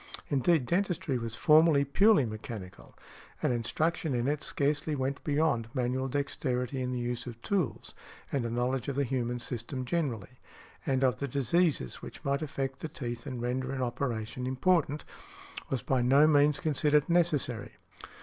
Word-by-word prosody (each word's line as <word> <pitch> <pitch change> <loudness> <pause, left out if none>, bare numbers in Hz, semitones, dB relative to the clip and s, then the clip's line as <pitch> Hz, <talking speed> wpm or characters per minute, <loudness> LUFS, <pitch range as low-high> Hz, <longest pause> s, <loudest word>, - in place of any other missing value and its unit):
Indeed, 145 +1 +2
dentistry 175 -4 0
was 115 -1 -4
formerly 155 -1 +5
purely 195 - +4
mechanical, 110 -3 -8 0.5
and - - +2
instruction 155 +5 -1
in 120 +1 0
it 150 +1 0
scarcely 145 +1 0
went 135 +1 -2
beyond 145 -6 +1
manual 130 +1 0
dexterity 130 -2 -2
in 125 0 -2
the 125 - -2
use 120 0 -3
of 120 -1 -8
tools; 185 - -1 0.4
and 135 -3 0
a 115 - -2
knowledge 125 +3 -1
of 140 - -2
the 140 - +2
human 125 -2 -1
system 125 +2 -4
generally, 125 - -2 0.5
and 135 -1 +1
of 125 -5 +2
the 140 - -2
diseases 140 - +1
which - - -10
might 140 +1 +1
affect 135 -3 -3
the 160 - -5
teeth 120 -3 -6
and 125 -3 -4
render 130 +2 -1
an 130 -1 -2
operation 120 -1 -3
important, 150 +2 +1 0.6
was 130 -4 -2
by 130 -2 +1
no 135 +5 +5
means 145 -1 +4
considered 150 -2 +2
necessary. 150 -10 +1
135 Hz, 160 wpm, -30 LUFS, 125-150 Hz, 0.6 s, formerly